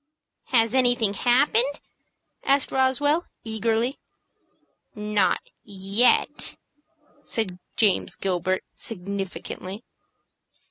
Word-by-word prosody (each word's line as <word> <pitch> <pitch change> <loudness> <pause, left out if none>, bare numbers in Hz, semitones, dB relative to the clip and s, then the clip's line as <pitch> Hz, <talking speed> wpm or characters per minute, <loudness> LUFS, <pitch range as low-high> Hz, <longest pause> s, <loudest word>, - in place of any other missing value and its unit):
"Has 230 -2 +2
anything 245 -5 +4
happened?" 255 +4 +2 0.6
asked 275 0 +2
Roswell, 290 +5 +2 0.2
eagerly. 225 +3 -1 1.0
"Not 210 -2 0
yet," 200 +4 +1 0.7
said 190 -9 -2 0.2
James 210 -4 +2
Gilbert, 185 0 -1
significantly. 195 0 -5
225 Hz, 65 wpm, -24 LUFS, 195-255 Hz, 1.0 s, anything